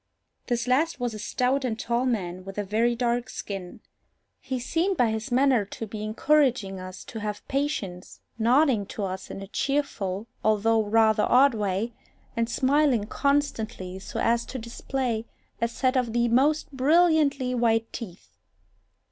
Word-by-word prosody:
This 240 Hz, -1 st, 0 dB
last 275 Hz, +4 st, +1 dB
was 245 Hz, -2 st, -2 dB
a 215 Hz, -, -7 dB
stout 255 Hz, +6 st, 0 dB
and 230 Hz, -4 st, -1 dB
tall 235 Hz, +3 st, 0 dB
man, 185 Hz, -6 st, -2 dB
with 195 Hz, +1 st, -9 dB
a 205 Hz, -, 0 dB
very 225 Hz, +4 st, +1 dB
dark 240 Hz, 0 st, 0 dB
skin. 190 Hz, -3 st, -7 dB, 0.6 s
He 260 Hz, -, -4 dB
seemed 335 Hz, +9 st, 0 dB
by 235 Hz, -3 st, +3 dB
his 220 Hz, +4 st, -4 dB
manner 255 Hz, -3 st, +4 dB
to 215 Hz, +3 st, -6 dB
be 210 Hz, 0 st, -7 dB
encouraging 230 Hz, -3 st, +1 dB
us 185 Hz, 0 st, -8 dB
to 225 Hz, -, -8 dB
have 210 Hz, -1 st, -5 dB
patience, 265 Hz, -11 st, -3 dB, 0.2 s
nodding 240 Hz, -2 st, +3 dB
to 205 Hz, -, -5 dB
us 190 Hz, 0 st, -4 dB
in 195 Hz, -, -6 dB
a -, -, -9 dB
cheerful 215 Hz, -6 st, -2 dB, 0.2 s
although 220 Hz, +1 st, +3 dB
rather 220 Hz, 0 st, +3 dB
odd 270 Hz, +1 st, +6 dB
way, 210 Hz, +2 st, -1 dB, 0.4 s
and 230 Hz, 0 st, 0 dB
smiling 265 Hz, -2 st, +2 dB
constantly, 220 Hz, -7 st, -1 dB
so 190 Hz, -, -6 dB
as 235 Hz, 0 st, +2 dB
to 265 Hz, -, -5 dB
display 235 Hz, -1 st, -3 dB, 0.3 s
a 235 Hz, -, +3 dB
set 255 Hz, +3 st, 0 dB
of 245 Hz, -3 st, 0 dB
the 240 Hz, 0 st, +2 dB
most 290 Hz, +7 st, +2 dB
brilliantly 290 Hz, -2 st, +3 dB
white 230 Hz, -2 st, +1 dB
teeth. 190 Hz, -6 st, -9 dB
235 Hz, 155 wpm, -26 LUFS, 210-265 Hz, 0.6 s, odd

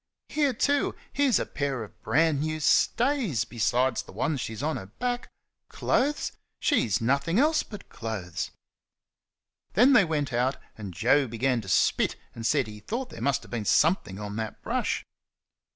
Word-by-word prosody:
Here, 290 Hz, -3 st, +2 dB
too! 285 Hz, +4 st, +1 dB, 0.2 s
here's 280 Hz, -5 st, +3 dB
a -, -, -1 dB
pair 140 Hz, -4 st, -2 dB
of 105 Hz, -, -14 dB
brand 160 Hz, -2 st, +2 dB
new 155 Hz, +1 st, -2 dB
stays, 230 Hz, -, +2 dB
besides 120 Hz, +2 st, +1 dB
the -, -, -14 dB
ones 130 Hz, -, -1 dB
she's 110 Hz, +3 st, -5 dB
on 155 Hz, +1 st, 0 dB
her 95 Hz, -, -8 dB
back. 245 Hz, -, -3 dB, 0.4 s
Clothes! 295 Hz, +3 st, 0 dB, 0.3 s
she's 120 Hz, -, +2 dB
nothin' 140 Hz, -, +1 dB
else 305 Hz, +4 st, +4 dB
but 210 Hz, -, -10 dB
clothes." 105 Hz, -7 st, -4 dB, 1.2 s
Then 250 Hz, +7 st, +6 dB
they 200 Hz, -8 st, +6 dB
came 150 Hz, -2 st, 0 dB
out, 125 Hz, +3 st, +1 dB, 0.2 s
and 105 Hz, -3 st, -7 dB
Joe 135 Hz, -, +3 dB
began 120 Hz, +1 st, 0 dB
to 95 Hz, -, -9 dB
spit 95 Hz, -, +2 dB, 0.2 s
and 115 Hz, 0 st, -3 dB
said 145 Hz, -4 st, +2 dB
he 105 Hz, -1 st, -9 dB
thought 245 Hz, -, -4 dB
there -, -, -9 dB
must 140 Hz, +2 st, +1 dB
have -, -, -15 dB
been 120 Hz, -3 st, -2 dB
something 145 Hz, -, +2 dB
on 105 Hz, 0 st, -5 dB
that 110 Hz, -1 st, -5 dB
brush. -, -, -1 dB
140 Hz, 165 wpm, -27 LUFS, -, 1.2 s, Then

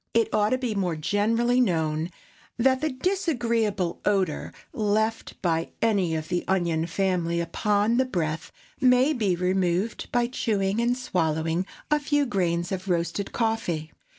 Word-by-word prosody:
It 230 Hz, -1 st, +2 dB
ought 210 Hz, 0 st, +3 dB
to 255 Hz, -, +2 dB
be 250 Hz, -4 st, -2 dB
more 185 Hz, -5 st, -1 dB
generally 230 Hz, +9 st, +2 dB
known 160 Hz, -6 st, 0 dB, 0.5 s
that 260 Hz, +2 st, +3 dB
the 310 Hz, -, +1 dB
disagreeable 240 Hz, -, 0 dB
odor 190 Hz, -6 st, 0 dB, 0.2 s
left 220 Hz, +1 st, -1 dB
by 165 Hz, -2 st, 0 dB
any 195 Hz, -7 st, +2 dB
of 155 Hz, 0 st, -3 dB
the 175 Hz, -, -1 dB
onion 170 Hz, -4 st, +1 dB
family 175 Hz, -2 st, 0 dB
upon 210 Hz, +6 st, +1 dB
the 260 Hz, -, +3 dB
breath 165 Hz, -8 st, -3 dB, 0.3 s
may 255 Hz, +3 st, +4 dB
be 210 Hz, -9 st, +1 dB
removed 185 Hz, +3 st, 0 dB
by 240 Hz, 0 st, +2 dB
chewing 215 Hz, -4 st, 0 dB
and 245 Hz, +1 st, +1 dB
swallowing 165 Hz, -5 st, -1 dB, 0.2 s
a 300 Hz, -, +4 dB
few 290 Hz, 0 st, +1 dB
grains 175 Hz, -6 st, 0 dB
of 190 Hz, 0 st, -4 dB
roasted 175 Hz, +3 st, -1 dB
coffee. 220 Hz, -9 st, -1 dB
200 Hz, 145 wpm, -26 LUFS, 170-235 Hz, 0.5 s, may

